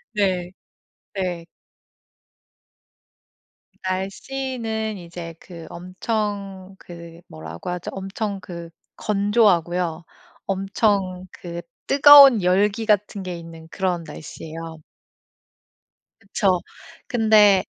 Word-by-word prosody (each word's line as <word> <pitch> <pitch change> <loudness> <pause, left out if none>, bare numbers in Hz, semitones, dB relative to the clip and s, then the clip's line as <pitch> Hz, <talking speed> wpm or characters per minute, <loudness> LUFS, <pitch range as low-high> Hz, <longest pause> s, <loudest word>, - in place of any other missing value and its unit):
네. 185 -3 0 0.6
네. 180 -4 -3 2.4
날씨는 220 +3 -3
이제 170 -1 -8
그 170 -3 -11
엄청 195 +1 -4
그 170 -1 -11
뭐라고 80 - -8
하죠? 180 -1 -4
엄청 195 +1 -4
그 170 -2 -8 0.3
건조하고요. 180 -5 +1 0.4
엄청 195 -1 0
그 170 -1 -7 0.3
뜨거운 275 -5 +9
열기 200 +4 +2
같은 205 -1 +1
게 180 -2 -5
있는 165 -1 -11
그런 180 -2 -1
날씨예요. 160 +1 -9 1.4
그쵸. 195 -3 +1 0.5
근데 215 -6 +5
190 Hz, 160 characters per minute, -22 LUFS, 170-210 Hz, 2.4 s, 뜨거운